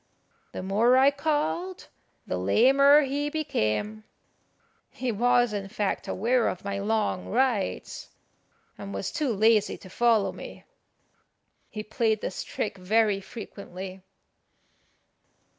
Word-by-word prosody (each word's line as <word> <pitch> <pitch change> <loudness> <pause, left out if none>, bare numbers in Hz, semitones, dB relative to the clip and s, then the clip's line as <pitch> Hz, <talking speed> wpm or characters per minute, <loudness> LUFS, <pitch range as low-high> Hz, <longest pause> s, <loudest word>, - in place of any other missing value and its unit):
The - - -6
more 220 +7 +3
I 270 +2 +6
called 315 +5 -2 0.4
the 90 - -3
lamer 275 - +5
he 285 +2 -2
became. 215 - -2 0.9
He 255 -2 -3
was, 245 +1 +2
in 200 -1 -3
fact, 205 0 -2
aware 235 +4 +1
of 185 - -4
my 200 0 -2
long 210 -2 -1
rides, 240 -4 -1 0.7
and 200 0 -7
was - - -3
too 295 -4 -1
lazy 220 0 +3
to 185 - -14
follow 230 -1 +2
me. - - -10 1.1
He 215 - -6
played 220 0 0
this - - -4
trick 200 -2 -4
very 210 +2 +2
frequently. 190 -2 -9
220 Hz, 115 wpm, -26 LUFS, 195-255 Hz, 1.1 s, I